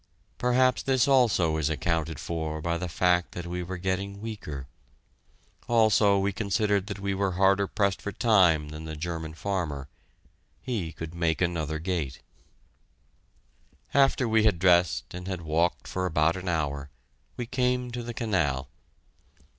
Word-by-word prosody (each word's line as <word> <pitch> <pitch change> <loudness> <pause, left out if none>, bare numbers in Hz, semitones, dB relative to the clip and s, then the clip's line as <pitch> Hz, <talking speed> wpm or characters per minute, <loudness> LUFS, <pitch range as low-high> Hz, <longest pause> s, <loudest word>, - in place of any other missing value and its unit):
Perhaps 125 0 +3
this 130 0 +2
also 110 - +3
is 80 -1 0
accounted 80 -1 -1
for 80 -2 -3
by 85 +2 -1
the 90 +1 -3
fact 90 +1 +1
that 90 - -6
we 90 +1 -4
were 90 +1 -5
getting 95 +2 -2
weaker: 100 - -6 1.0
also, 110 -3 +4
we 100 +1 0
considered 100 -1 0
that 100 -2 -5
we 100 0 -2
were 95 -1 0
harder 95 +2 +3
pressed 100 -2 0
for 105 - -4
time 90 -9 +3
than 75 +1 -8
the 80 0 -6
German 80 0 -5
farmer 80 -8 -3 0.7
he 105 -11 -3
could 80 0 -7
make 85 -2 0
another 80 -4 -1
gate. 80 -5 -3 1.7
After 135 -2 +3
we 110 -1 +3
had 105 -5 +3
dressed 90 -1 +3
and 90 +1 -7
had 95 -3 -3
walked 80 +2 0
for 95 0 -2
about 80 0 +2
an 95 -1 -4
hour, 70 -4 -2 0.5
we 120 - -3
came 125 0 0
to 120 0 -4
the 120 0 -6
canal. 75 - 0
90 Hz, 150 wpm, -27 LUFS, 80-105 Hz, 1.7 s, also